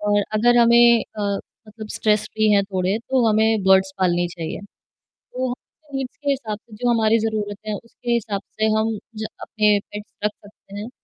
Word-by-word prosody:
और 205 0 +2
अगर 240 +3 +4
हमें 235 0 +6 0.2
अ, - - -2 0.5
मतलब 215 0 -9
स्ट्रेस 215 -2 +2
फ्री 215 0 +2
हैं 200 -1 +4
थोड़े, 190 +1 -1
तो 245 +1 +1
हमें 220 0 +2
बर्ड्स 190 0 +4
पालनी 175 -2 +2
चाहिए। 165 -2 -6 0.8
वो 255 0 0
हमारे 285 +3 -10
नीड्स 265 -2 -5
के 290 -1 -3
हिसाब 230 -6 -3
से 225 -1 -16
जो 245 +3 -1
हमारी 225 -1 +3
ज़रूरतें 215 -1 -3
हैं, 205 - -2
उसके 240 +1 -6
हिसाब 215 -4 -1 0.2
से 215 - +3
हम 220 0 0 0.2
ज 215 0 -4 0.2
अपने 210 -1 +2
पेट्स 210 0 -8
रख 210 - +2
सकते 200 -1 -16
हैं। 215 +3 -6
215 Hz, 185 wpm, -22 LUFS, 205-235 Hz, 0.8 s, हमें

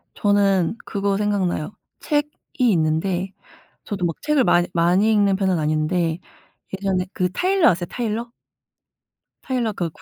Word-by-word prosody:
저는 200 -2 +2
그거 200 -1 -1
생각나요. 200 -5 -1 0.3
책이 295 -1 0 0.4
있는데 175 +3 0 0.5
저도 195 -4 -3
막 165 - -1
책을 300 -4 +2
많이 175 -4 +3
많이 180 +6 +3
읽는 200 -2 +3
편은 190 -3 0
아닌데 155 +2 0 0.6
예전에 190 -1 -1
그 180 -1 -1
타일러 375 -1 +3
아세요 175 0 -2
타일러? 235 0 -3 1.1
타일러 240 -5 -1
그 170 -2 -2
국 - - -21
195 Hz, 280 characters per minute, -22 LUFS, 175-210 Hz, 1.1 s, 많이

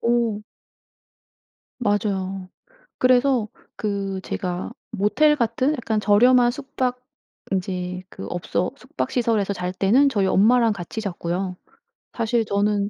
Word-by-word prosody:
오. 235 -3 +1 1.4
맞아요. 195 -4 -1 0.5
그래서 255 -2 +3 0.3
그 200 -3 -2
제가 180 +2 -4 0.2
모텔 260 +9 +3
같은 245 +3 +1
약간 230 -7 -1
저렴한 240 +5 +5
숙박 255 -1 -3 0.5
이제 180 -1 -3
그 - - -9
업소 175 +2 -2
숙박 265 0 -4
시설에서 225 -5 +1
잘 180 -1 -3
때는 225 +10 +4
저희 205 -7 +1
엄마랑 225 +4 +4
같이 195 +2 -6
잤고요. 180 -2 -3 0.6
사실 230 0 0
저는 205 0 +1
210 Hz, 230 characters per minute, -23 LUFS, 190-245 Hz, 1.4 s, 저렴한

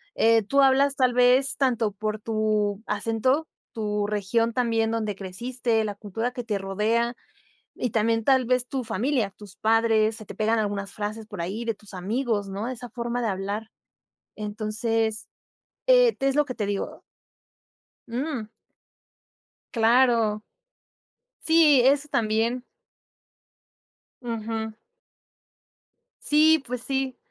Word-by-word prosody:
eh, 225 0 +4
tú 275 +8 +2
hablas 275 +1 +4
tal 255 -2 +2
vez 250 +2 +4
tanto 240 -5 +1
por 215 +1 -3
tu 215 -2 0
acento, 230 +8 0 0.3
tu 210 -2 -1
región 215 +3 0
también 225 -2 +1
donde 215 -3 -2
creciste, 225 +4 -2
la 205 -1 -3
cultura 225 +4 -3
que 245 -1 -6
te 215 -3 -2
rodea, 215 +5 0 0.6
y 245 - -2
también 225 +1 +1
tal 260 +1 +3
vez 250 0 +1
tu 265 -1 -3
familia, 225 +1 0
tus 205 -3 -13
padres, 220 -1 +3
se 215 -1 -9
te - - -9
pegan 220 +2 +1
algunas 200 -2 -2
frases 215 +1 -5
por 175 - -6
ahí 195 +7 -4
de 230 -1 -1
tus 205 0 -15
amigos, 210 +2 -1
¿no?, 200 +3 -4
de 255 - -3
esa 245 0 -9
forma 240 +1 -3
de 235 - 0
hablar. 205 +3 -3 0.7
Entonces, 215 +1 -2 0.6
eh, - - +5
es 270 0 +1
lo 295 - +4
que 260 -3 -6
te 210 -4 -2
digo. 200 -1 -4 1.1
Mm. 245 -2 -3 1.2
Claro. 230 -2 +3 1.0
Sí, 320 -5 +5
eso 280 +3 +3
también. 230 +1 0 1.6
Ujú. 225 -2 -4 1.5
Sí, 310 0 +4
pues 250 0 -4
sí. 265 -1 -2
225 Hz, 130 wpm, -25 LUFS, 210-250 Hz, 1.6 s, eh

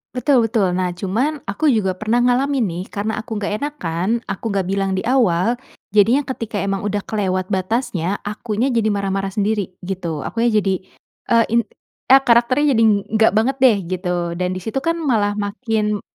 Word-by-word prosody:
Betul 250 -4 +2
betul. 200 -6 +1
Nah 180 0 0
cuman 215 - -1
aku 290 +10 0
juga 200 -6 +1
pernah 215 +5 -1
ngalamin 250 +1 +2
nih 175 0 -4
karena 215 +1 -3
aku 220 -2 -5
nggak 205 +2 -3
enakan, 190 - -3 0.2
aku 200 - -6
nggak 195 -2 0
bilang 195 0 -1
di 190 - -3
awal 230 -4 +2 0.4
jadinya 230 +7 +4
ketika 230 -4 -4
emang 195 -1 -1
udah 205 0 -2
kelewat 185 -3 -1
batasnya, 195 -2 -1
akunya 220 +4 -2
jadi 220 -2 +2
marah-marah 195 -1 -1
sendiri 205 0 -1 0.2
gitu. 175 -5 -4
Akunya 235 +1 0
jadi, 195 -3 0 0.5
eee, 230 -1 +4
in 235 - +5 0.5
a 270 - +9
karakternya 255 +4 +3
jadi 225 - +2
ng - - +5 0.2
nggak 225 - +5
banget 250 +4 +2
deh 240 -6 +6
gitu 175 -1 -2
dan 180 +1 -2
di 185 - -3
situ 265 +4 -2
kan 330 +2 0
malah 215 -10 0
makin 210 0 -1
210 Hz, 175 wpm, -20 LUFS, 190-240 Hz, 0.5 s, a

